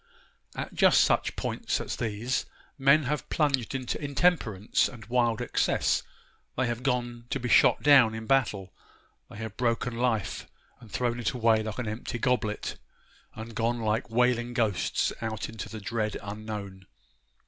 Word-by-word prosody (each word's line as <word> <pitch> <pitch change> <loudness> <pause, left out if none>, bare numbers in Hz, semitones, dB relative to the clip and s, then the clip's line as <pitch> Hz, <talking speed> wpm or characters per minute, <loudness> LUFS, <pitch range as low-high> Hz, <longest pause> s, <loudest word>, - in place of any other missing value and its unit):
At - - -5
just - - +5
such - - +2
points - - -2
as - - -4
these 115 +2 -2 0.3
men 140 +3 +4
have 150 +3 -3
plunged 135 -5 0
into 130 +3 -3
intemperance 140 - +1
and 110 -3 -11
wild 120 -1 +1
excess; - - +1 0.6
they 130 - +2
have 120 0 -2
gone 120 -3 -2
to 135 - -1
be 125 - -3
shot - - +5
down 135 -7 +6
in 110 0 -6
battle; 105 -8 +1 0.6
they - - -11
have 110 0 -6
broken 120 0 0
life, 115 -4 -1 0.3
and 115 -3 -14
thrown 120 +1 -1
it 120 - -1
away 115 -3 +3
like 110 -1 -5
an 125 -3 -3
empty 115 +3 -4
goblet; 115 -4 -1 0.6
and 110 +1 -8
gone 115 +2 0
like 110 0 -1
wailing 120 +1 +1
ghosts 110 -6 0
out 110 -1 -3
into 110 -2 -7
the 110 - -7
dread 110 0 -2
unknown. 100 -3 -7
115 Hz, 155 wpm, -28 LUFS, 110-125 Hz, 0.6 s, down